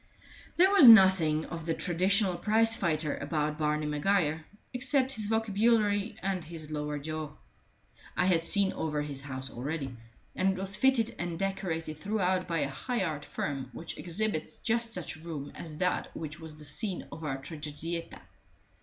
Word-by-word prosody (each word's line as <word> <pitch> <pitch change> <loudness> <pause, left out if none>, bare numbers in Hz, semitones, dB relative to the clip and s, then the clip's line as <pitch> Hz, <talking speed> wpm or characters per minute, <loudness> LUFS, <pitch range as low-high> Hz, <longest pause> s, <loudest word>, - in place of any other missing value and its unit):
There 375 +3 +6
was 390 -10 +8
nothing 190 -8 +7
of 165 -1 -7
the 165 - +1
traditional 185 +2 +2
prize 225 +5 +2
fighter 160 -7 0
about 150 +1 -2
Barney 150 0 0
Maguire, 155 +1 +1 0.3
except 255 +1 +1
his 215 -4 -2
vocabulary 215 -1 +2
and 190 -2 -1
his 155 -1 -9
lower 150 -1 -3
jaw. 155 0 -5 0.8
I - - +3
had 175 -3 +3
seen 195 +2 +2
over 150 -2 -2
his 140 -2 -4
house 130 -1 -6
already, 135 +1 -4 0.4
and 190 +1 +2
it - - -7
was 195 +1 +1
fitted 265 -2 +3
and 175 -1 -3
decorated 175 -5 -3
throughout 190 -2 0
by 165 -3 0
a 140 - +1
high 195 - -2
art 150 -4 -3
firm 135 -3 -4
which 165 - -6
exhibits 180 -1 -2
just 230 0 0
such 180 -6 -3
a - - -15
room 155 -4 -6
as 155 -3 -7
that 180 +2 0
which 155 -2 -6
was 160 -2 -8
the 150 0 -11
scene 185 +6 -1
of 160 +3 -8
our 135 -3 -2
tragedietta. 155 +3 -5
170 Hz, 165 wpm, -30 LUFS, 150-200 Hz, 0.8 s, was